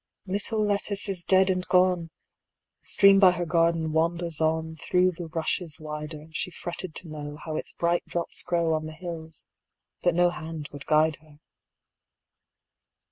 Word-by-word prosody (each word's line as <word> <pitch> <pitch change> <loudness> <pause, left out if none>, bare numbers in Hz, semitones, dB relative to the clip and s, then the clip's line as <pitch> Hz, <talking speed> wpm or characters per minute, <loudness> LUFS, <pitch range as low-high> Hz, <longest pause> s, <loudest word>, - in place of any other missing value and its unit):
Little 210 +3 -1
Lettice 205 0 +1
is 185 -3 0
dead 190 +1 +4
and 185 -1 -1
gone! 180 -2 +3 0.7
The - - -19
stream 200 -1 +6
by 185 -2 +7
her 175 -1 -2
garden 165 -1 +1
wanders 170 0 0
onThrough 160 +3 +1
the 175 - -5
rushes 165 0 -2
wider; 150 0 -6
She 160 - -2
fretted 175 -1 -5
to 175 - -3
knowHow 150 +1 -6
its - - -5
bright 170 0 0
drops 170 -1 -3
growOn 160 -2 0
the 155 - -8
hills, 160 -2 -8 0.6
but 175 -2 +2
no 175 0 +4
hand 160 -3 -7
would 145 0 -10
guide 155 0 +3
her. 155 -1 -20
170 Hz, 145 wpm, -26 LUFS, 155-180 Hz, 0.7 s, by